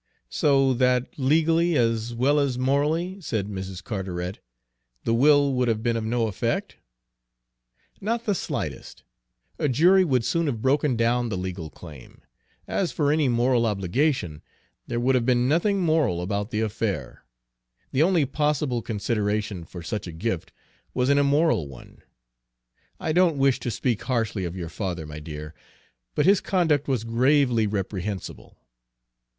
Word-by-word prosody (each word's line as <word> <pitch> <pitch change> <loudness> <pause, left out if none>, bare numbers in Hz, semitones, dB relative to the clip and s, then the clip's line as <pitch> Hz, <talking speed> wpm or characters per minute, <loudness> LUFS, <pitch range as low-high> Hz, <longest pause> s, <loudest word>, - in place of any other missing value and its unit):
"So 135 -2 +3
that 125 +2 +1
legally, 165 +4 +3
as 115 0 0
well 140 +5 +3
as 135 -3 0
morally," 150 +8 0
said 110 - -2
Mrs. 95 -3 -6
Carteret, 95 -3 -4 0.6
"the 115 - +1
will 140 +3 +4
would 125 -1 +1
have 110 -1 0
been 120 -1 +1
of 115 - -2
no 115 +1 0
effect?" 105 -4 -2 1.2
"Not 230 +3 -2
the 205 - +2
slightest. 185 - -5 0.6
A 150 - +1
jury 180 +9 +5
would 130 -9 +1
soon 170 -2 0
have 120 -6 -2
broken 135 +2 +2
down 120 +1 +1
the 100 - -2
legal 90 -3 -5
claim. 75 -6 -13 0.5
As 185 - -1
for 145 -2 +1
any 155 -2 +2
moral 120 0 +2
obligation, 100 - -1 0.5
there 120 - -2
would 130 +2 +2
have 125 -2 +2
been 125 0 +2
nothing 190 +7 +2
moral 155 - +1
about 100 +3 -2
the 110 -1 -1
affair. 100 - -3 0.7
The 135 - +1
only 170 -3 +3
possible 145 -3 0
consideration 105 -2 -2
for 85 0 -9
such 105 +2 -4
a - - -6
gift 90 +2 -3 0.4
was 125 +1 +1
an 140 0 +4
immoral 140 - +2
one. 65 -3 -14 1.0
I 160 - -2
don't 170 -2 +3
wish 135 -1 +3
to - - -3
speak 120 0 -1
harshly 115 -6 -1
of 85 +1 -5
your 85 -3 -5
father, 85 -2 -4
my 75 0 -8
dear, 75 0 -8 0.6
but - - +2
his 195 +1 +5
conduct 160 -7 +1
was 130 -5 0
gravely 120 -1 +2
reprehensible. 100 -1 -5
120 Hz, 150 wpm, -25 LUFS, 100-145 Hz, 1.2 s, jury